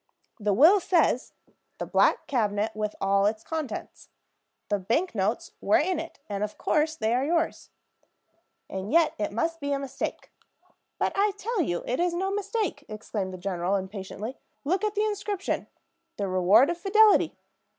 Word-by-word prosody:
"The 205 -1 +1
will 320 - +7
says, 335 -9 +1 0.4
'The - - -4
black - - +3
cabinet, 220 -6 0
with 215 -1 -3
all 195 +1 +3
its 215 +1 -2
contents.' 320 -4 -5 0.6
The 205 -1 +1
bank 240 - 0
notes 210 +2 -1
were 205 - +4
in 350 +2 0
it, 330 - -7
and 205 0 -3
of 210 - -4
course 315 +1 +1
they 220 -4 0
are 250 +2 +2
yours." 330 +3 -1 1.0
"And 190 +2 -5
yet 330 +1 +4
it 210 - -1
must 330 +10 -1
be 285 -1 -3
a - - +1
mistake." 275 -1 -5 0.7
"But - - 0
I 405 +1 +2
tell 440 0 -1
you 175 - -1
it 250 - -1
is 350 0 +1
no 380 +2 -1
mistake," 405 -6 -2
exclaimed 215 -2 -4
the 185 - -7
general, 185 0 -1
impatiently. 200 +4 -5 0.3
"Look 365 +8 0
at 425 0 0
the 420 +1 +2
inscription, 410 -1 -2 0.5
'The 200 - -1
Reward 190 - +5
of 345 - -5
Fidelity!' 425 +3 +4
270 Hz, 165 wpm, -27 LUFS, -, 1.0 s, will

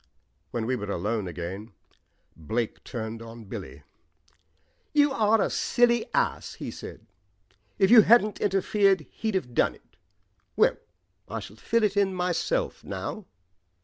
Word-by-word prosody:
When 115 -2 -3
we 130 +2 0
were 105 -4 -5
alone 105 0 -1
again 90 +6 -6 0.6
Blake 110 +9 -3
turned 115 -1 -5
on 115 0 -10
Billy. 70 -8 -8 1.1
"You 290 -1 +4
are 220 -3 +3
a - - +1
silly 240 -1 +2
ass," - - -1
he - - -6
said. - - -10 0.7
"If 190 +2 +3
you 235 -2 +10
hadn't 215 -1 +4
interfered, 195 -1 +3
he'd 220 -3 -3
have 125 -10 -2
done - - +2
it. - - -26 0.6
Well, - - +4 0.5
I 115 - -3
shall 100 0 -10
fill 230 - 0
it 205 -1 +2
in 195 -2 +2
myself 180 - -1
now." 215 -4 -5
180 Hz, 140 wpm, -27 LUFS, -, 1.1 s, you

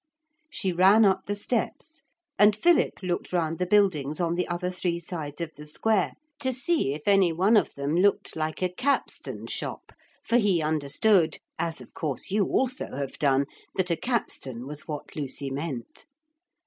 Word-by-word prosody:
She 195 -10 -1
ran 195 +5 +6
up 190 -1 +2
the 205 - -1
steps 250 +9 -3 0.4
and 210 0 +6
Philip 330 - +2
looked 175 -1 -2
round 165 -2 0
the 180 - 0
buildings 175 -8 +2
on 170 -1 +1
the 180 +1 -1
other 175 +1 -2
three 175 -1 -2
sides 160 -3 -5
of 165 -2 -4
the 150 0 -11
square, 200 +5 +1 0.3
to 260 -2 0
see 260 - 0
if 150 - -9
any 195 -3 +5
one 190 +7 +3
of 210 - +2
them 140 +2 -2
looked 195 +3 +2
like 155 +2 -2
a 180 - +2
capstan 275 +8 -1
shop, - - -5 0.3
for 235 - +2
he 205 -7 +3
understood, 160 +3 +2 0.2
as 165 -1 -2
of - - -14
course 150 +1 -4
you 205 0 +3
also 255 - -1
have 140 -1 -5
done, 140 -2 +3 0.3
that 180 -2 0
a - - +3
capstan 135 - -3
was 150 +2 -7
what 150 -2 -6
Lucy 140 -1 -4
meant. 135 - -5
175 Hz, 175 wpm, -27 LUFS, 150-205 Hz, 0.4 s, ran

